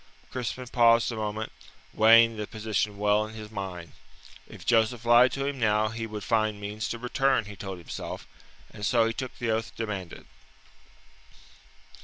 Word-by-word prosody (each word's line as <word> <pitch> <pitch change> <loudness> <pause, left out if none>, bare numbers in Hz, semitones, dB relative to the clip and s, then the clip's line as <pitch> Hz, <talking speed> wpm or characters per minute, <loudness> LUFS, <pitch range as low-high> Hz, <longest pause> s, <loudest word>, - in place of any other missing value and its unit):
Crispin 130 0 -4
paused 115 -1 +4
a - - -4
moment, 110 0 -3 0.4
weighing 115 +1 +6
the 105 -1 -5
position 105 -1 -2
well 105 +1 +2
in 110 - -11
his 110 -1 -9
mind. 95 -5 -6 0.6
If - - -12
Joseph 115 0 +2
lied 120 +1 +6
to 135 0 -2
him 140 -1 -3
now, 110 -1 +2
he 115 +1 -5
would 105 -2 -6
find 110 -2 +1
means 105 +1 -4
to 120 - -3
return, 130 0 +1
he 105 0 -9
told 95 -2 -6
himself, 85 - -7 0.5
and 105 - -10
so 115 +2 +3
he 115 - -1
took 130 +1 -6
the 115 -2 -1
oath 110 +1 -2
demanded. 100 -6 -5
110 Hz, 165 wpm, -27 LUFS, 105-115 Hz, 0.6 s, weighing